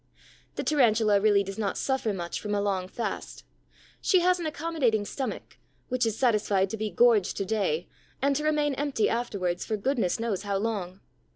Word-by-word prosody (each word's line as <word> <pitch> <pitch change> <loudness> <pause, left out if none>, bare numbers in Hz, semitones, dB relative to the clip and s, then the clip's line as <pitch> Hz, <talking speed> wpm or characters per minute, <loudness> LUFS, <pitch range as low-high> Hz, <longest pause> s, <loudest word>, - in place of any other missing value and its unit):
The - - -3
Tarantula 220 -8 +3
really 205 -1 +4
does 195 +2 -7
not 205 -2 -1
suffer 265 -4 0
much 175 -3 -4
from 210 -1 -2
a - - +1
long 195 -2 -1
fast. 230 +5 -5 0.6
She 370 -3 +4
has 360 +1 +3
an 335 - -2
accommodating 290 -9 0
stomach, 265 +4 -5 0.3
which 250 -2 +1
is 220 -1 -2
satisfied 205 -6 +2
to - - -2
be 215 0 -2
gorged 230 -4 +3
to 195 - -1
day 185 -6 -1 0.3
and 280 +1 +2
to 300 - -1
remain 300 -2 +1
empty 275 -5 0
afterwards 195 -7 -1
for 220 - -2
goodness 225 -3 0
knows 225 -5 -1
how 200 -1 -1
long. 195 -3 -3
220 Hz, 180 wpm, -27 LUFS, 200-265 Hz, 0.6 s, really